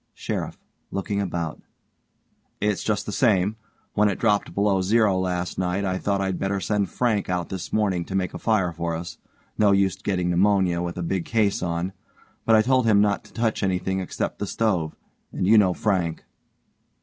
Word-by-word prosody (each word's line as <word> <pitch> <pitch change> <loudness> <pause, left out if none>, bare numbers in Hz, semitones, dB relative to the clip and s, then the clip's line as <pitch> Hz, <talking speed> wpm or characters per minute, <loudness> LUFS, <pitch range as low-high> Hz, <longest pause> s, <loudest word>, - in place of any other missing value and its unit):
SHERIFF: - - -4 0.3
(looking 100 +1 -2
about) 85 -4 -3 1.0
It's 105 -1 0
just 105 -2 -1
the - - -4
same. 105 -3 +2 0.4
When 105 0 +3
it 95 - -2
dropped 105 -2 +1
below 100 -1 +2
zero 105 +1 +3
last 90 -1 -2
night 90 +2 0
I 95 -1 -1
thought 100 -1 0
I'd 95 -2 -1
better 95 0 -1
send 100 +1 0
Frank 110 -1 0
out 90 -2 -1
this 95 -2 -5
morning 100 -5 +1
to 95 - -5
make 95 -2 -1
a - - -6
fire 105 -6 +1
for 85 0 -3
us 85 0 -7 0.4
no 105 -2 +5
use 95 -2 +2
getting 90 -3 -1
pneumonia 95 -1 +2
with 85 0 -4
a 90 - -2
big 90 +1 -1
case 110 -3 +1
on, 90 +1 -2 0.5
but 115 - +6
I 110 - +5
told 130 0 +2
him 105 -2 +5
not 100 -1 +2
to - - -17
touch 115 -1 0
anything 95 -1 0
except 95 - -3
the 100 - -2
stove 90 -8 0 0.4
and - - -2
you 105 +4 +6
know 95 -3 +3
Frank. 90 -6 -1
95 Hz, 185 wpm, -24 LUFS, 90-105 Hz, 1.0 s, but